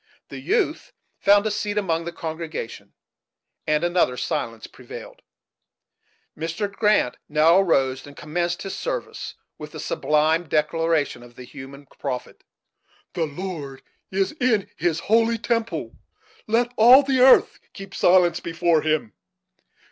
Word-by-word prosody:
The - - -8
youth 395 -6 -1 0.3
found 205 +1 +4
a 215 - 0
seat 210 0 -3
among 170 -5 0
the 170 - -4
congregation, 160 -7 -6 0.7
and 155 +1 +1
another 175 -8 +1
silence 115 -2 -3
prevailed. - - -11 1.1
Mr. 165 +6 -3
Grant 210 - +2
now 160 +4 +5
arose 135 -8 +1
and 145 - -14
commenced 175 +3 -2
his 195 - -5
service - - -5 0.2
with - - -9
the - - -7
sublime 160 - +1
declaration 160 -2 0
of 120 0 -15
the 125 - -10
Hebrew 135 +3 -11
prophet: 130 -3 -5 0.7
"The 165 -3 -1
Lord 150 -4 -7 0.3
is 195 0 0
in 230 -6 +1
His 165 -2 -1
holy 230 +1 +2
temple; 230 +1 -2 0.5
let 235 +2 +1
all 250 +5 +8
the 265 -1 0
earth 260 +1 +6
keep 195 0 -10
silence 175 -1 +4
before 170 -1 +1
Him." 155 -7 -1
170 Hz, 130 wpm, -23 LUFS, 150-210 Hz, 1.1 s, all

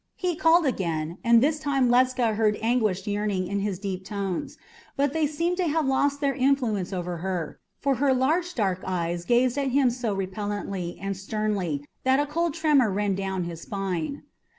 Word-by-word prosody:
He 360 -2 -1
called 330 +1 +4
again, 170 - -2
and 235 0 +5
this 300 +1 +2
time 275 -4 +1
Ledscha 245 -2 +3
heard 215 -1 +2
anguished 220 -5 +1
yearning 205 -2 -1
in 200 +2 -2
his 200 -2 -2
deep 190 -1 -4
tones; 195 -2 -4 0.4
but 280 0 +1
they 320 -2 +2
seemed 335 +4 -1
to 365 -2 +1
have 315 0 +1
lost 280 +2 +1
their 280 -1 +2
influence 255 -8 +1
over 180 -2 -3
her, 175 -2 -4 0.2
for 275 -2 +1
her 275 +2 +3
large 320 +8 +1
dark 190 -5 0
eyes 175 -2 -2
gazed 245 +4 +2
at 275 -1 0
him 260 -1 +3
so 235 -4 -2
repellently 195 -2 -4
and 195 0 -3
sternly 195 -7 -2 0.2
that 260 +1 +3
a 290 - +2
cold 330 +1 -1
tremor 300 -8 +3
ran 200 0 0
down 190 -1 -2
his 170 -1 -6
spine. 195 - -3
215 Hz, 180 wpm, -26 LUFS, 190-275 Hz, 0.4 s, and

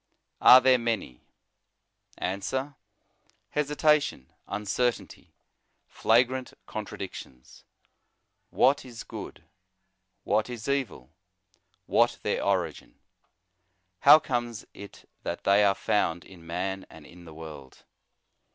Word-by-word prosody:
Are 125 - +10
there 130 -1 +4
many? 110 - -3 1.0
Answer: 130 +10 -3 0.8
Hesitation, 150 - +1 0.2
uncertainty, 105 +4 -3 0.5
flagrant 125 +3 +1
contradictions. 65 -1 -9 0.9
What 140 +2 +3
is 120 -3 -9
good? - - -9 0.8
what 110 +3 0
is 120 -2 -7
evil? 140 -3 -2 0.7
what - - +2
their - - -1
origin? - - -2 1.0
How - - +9
comes 120 -6 -3
it 100 -1 -12
that - - -5
they 100 +1 +4
are 100 -1 +3
found 85 -4 0
in 85 -3 -15
man 95 +3 -4
and 80 -2 -14
in 85 +2 -15
the 80 - -12
world 75 -5 -11
110 Hz, 95 wpm, -27 LUFS, 90-130 Hz, 1.0 s, Are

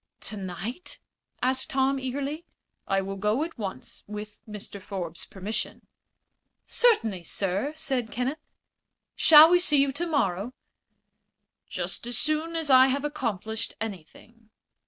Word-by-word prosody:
"Tonight?" 205 - -5 0.4
asked 260 +3 +1
Tom, 270 -1 +1
eagerly. 280 +5 -3 0.4
"I 195 0 +2
will 195 +1 -5
go 210 +8 +1
at 325 -6 -7
once, 190 -11 -5
with 210 0 -7
Mr. 205 -1 -8
Forbes's 180 -4 -5
permission." 200 +3 -5 0.8
"Certainly, 225 - +2
sir," 195 - -1
said 265 -7 0
Kenneth. 260 +6 -2 0.8
"Shall 315 +1 +9
we 355 - +6
see 305 -4 +3
you 275 0 +3
tomorrow?" 255 - -1 1.2
"Just - - -4
as 240 -2 -2
soon 310 +3 0
as 320 -4 0
I 260 0 +8
have 275 +2 -1
accomplished 220 -7 -3
anything." 220 +3 -9
245 Hz, 120 wpm, -27 LUFS, 200-290 Hz, 1.2 s, Shall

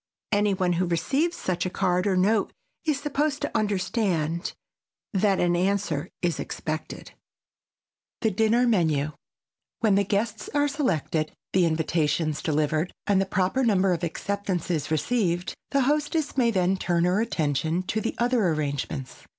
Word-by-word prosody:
Any 205 -1 +2
one 180 -2 +1
who 180 +1 0
receives 275 - 0
such 185 -2 -1
a 185 - -1
card 180 0 +1
or 190 -2 +2
note 200 +3 +2 0.3
is 300 -3 +1
supposed 295 0 -1
to - - -3
understand 185 -5 0 0.6
that 195 0 +2
an 175 0 +2
answer 185 -5 0
is 175 -2 0
expected. 155 0 -5
[Sidenote: - - -27 1.1
THE 220 - +3
DINNER 225 +5 +3
MENU] 155 -9 +2 0.7
When 220 -4 +4
the 200 +1 +4
guests 210 +2 -1
are 290 0 +3
selected, 170 - -1 0.2
the 185 -3 +4
invitations 155 -1 0
delivered 155 +2 0
and 200 -2 +3
the 195 - -1
proper 190 +8 +1
number 195 -5 +3
of 170 0 -3
acceptances 180 -3 -2
received, 175 +1 0 0.2
the 275 - +2
hostess 295 +2 0
may 250 -3 +3
then 190 -3 +2
turn 170 -2 +1
her 180 +4 +2
attention 160 - 0
to 215 +4 -2
the 230 - -2
other 240 -4 +2
arrangements. 145 -4 -3
185 Hz, 150 wpm, -26 LUFS, 165-220 Hz, 1.1 s, When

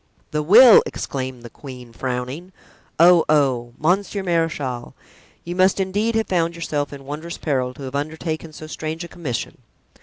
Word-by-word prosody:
"The 150 - 0
will!" 220 +9 +8
exclaimed 130 -3 -5
the 120 - -9
queen, 125 -4 -11
frowning. 130 +8 -4 0.5
"Oh! 170 0 +7
oh! 130 -6 +2
monsieur 195 +4 0
marechal, 160 -8 -2 0.5
you 175 +1 -5
must 185 +1 +3
indeed 205 +4 0
have 225 0 +1
found 170 -2 0
yourself 150 -4 -3
in 140 -1 -10
wondrous 155 +4 -6
peril 130 -4 -1
to 140 - -10
have 130 0 -6
undertaken 155 +2 -4
so 155 - -10
strange 155 +1 -5
a - - -7
commission!" 130 -12 -5
155 Hz, 155 wpm, -21 LUFS, 135-175 Hz, 0.5 s, will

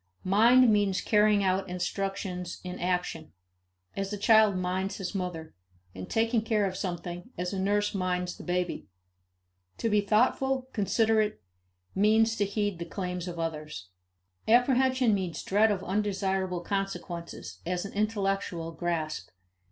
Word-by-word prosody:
Mind 230 +5 +5
means 200 -2 +2
carrying 210 -1 +3
out 190 0 0
instructions 180 0 -3
in 180 0 -6
action 180 -3 -2 0.6
as 195 0 -3
a 205 - -3
child 215 -1 +5
minds 185 +2 -2
his 195 0 -4
mother 175 -5 -4 0.4
and 95 0 -8
taking 225 +1 +2
care 215 -2 +1
of 190 -1 -2
something 175 +1 -5
as 180 +2 -3
a 195 - -2
nurse 205 +2 +1
minds 180 -2 -1
the - - -11
baby. 180 - -2 0.9
To 230 - -1
be 210 0 +4
thoughtful, 255 +5 +1
considerate, 215 0 +1 0.5
means 220 +3 +3
to 205 - +2
heed 205 -2 -2
the 170 - -4
claims 180 0 -4
of 175 -1 -6
others. 150 - -5 0.6
Apprehension 255 0 +4
means 185 -5 -2
dread 210 +3 +3
of 200 -3 -1
undesirable 190 -2 -1
consequences, 175 - -4
as 180 0 -2
well 200 - -7
as - - -17
intellectual 195 -5 -1
grasp. 160 -2 -3
195 Hz, 140 wpm, -28 LUFS, 180-210 Hz, 0.9 s, Mind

